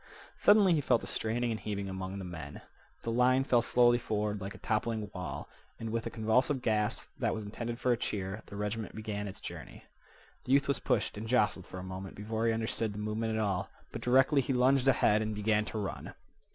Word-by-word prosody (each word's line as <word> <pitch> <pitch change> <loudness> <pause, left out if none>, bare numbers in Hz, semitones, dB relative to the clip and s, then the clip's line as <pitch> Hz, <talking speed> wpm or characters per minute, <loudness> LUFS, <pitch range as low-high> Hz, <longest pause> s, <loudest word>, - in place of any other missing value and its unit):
Suddenly 205 -3 +6
he 155 - +2
felt 125 -4 +2
a - - -4
straining 115 +2 -1
and 110 - -2
heaving 100 -2 -3
among 95 0 -5
the 95 - -5
men. 80 -5 -7 0.4
The 115 - -2
line 125 +2 +4
fell 120 -3 +3
slowly 120 0 +4
forward 105 -3 -2
like 95 +1 -5
a - - -9
toppling 110 -1 -1
wall, 75 -6 -5 0.3
and, 115 -1 -4
with 115 0 -2
a - - -2
convulsive 125 +4 +1
gasp 105 -3 0
that - - +1
was 110 - -4
intended 115 +3 -5
for 125 - +2
a 120 - +3
cheer, 100 0 -3
the - - -9
regiment 105 +1 -3
began 105 -2 -4
its 95 - -8
journey. - - -9 0.6
The 130 - +1
youth 140 0 +4
was 140 - +1
pushed - - 0
and 110 - -5
jostled 105 -6 +2
for - - -8
a 90 - -6
moment 95 +1 -7
before 110 +2 -2
he - - +4
understood 110 -1 -1
the - - -8
movement 110 +1 -2
at - - 0
all, 100 -2 -1 0.2
but 115 - -6
directly 135 +4 +4
he 135 - -1
lunged 130 +1 +3
ahead 110 -5 +4
and 110 0 -2
began 105 0 +1
to 110 - -5
run. 100 -2 -5
110 Hz, 220 wpm, -31 LUFS, 105-120 Hz, 0.6 s, Suddenly